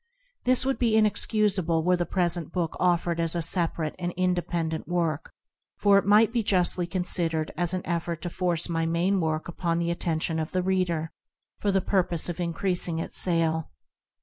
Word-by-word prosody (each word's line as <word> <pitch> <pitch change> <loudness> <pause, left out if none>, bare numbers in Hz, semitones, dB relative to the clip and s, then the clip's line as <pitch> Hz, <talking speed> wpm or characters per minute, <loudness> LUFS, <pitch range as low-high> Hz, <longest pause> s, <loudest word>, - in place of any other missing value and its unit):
This 255 0 +4
would 270 0 -1
be 235 -3 +2
inex 215 -1 +2
cusable 190 -7 +1
were 180 +1 +3
the 175 -2 -2
present 175 -3 0
book 175 -3 -2
offered 175 -1 +1
as 165 0 +2
a 170 - 0
separate 165 -2 0
and 175 0 -2
independent 175 -3 -1
work, 165 -3 -2 0.5
for 200 -1 +5
it 200 - -5
might 215 +2 +5
be 235 - +1
justly 180 -3 +1
con 180 +1 -2
sidered 165 -3 0
as 175 +2 -1
an 185 - -4
effort 170 0 -2
to 175 - -3
force 175 -3 0
my 165 -1 -1
main 175 +4 +1
work 160 -1 -2
upon 170 -1 -2
the 170 0 0
attention 165 -1 -1
of 155 0 -4
the 185 -1 0
reader, 180 -4 -1 0.5
for 205 - 0
the 195 0 +2
purpose 180 -4 0
of 175 0 -5
increasing 175 0 -1
its 165 - -5
sale. 165 -3 +1
175 Hz, 185 wpm, -26 LUFS, 165-185 Hz, 0.5 s, for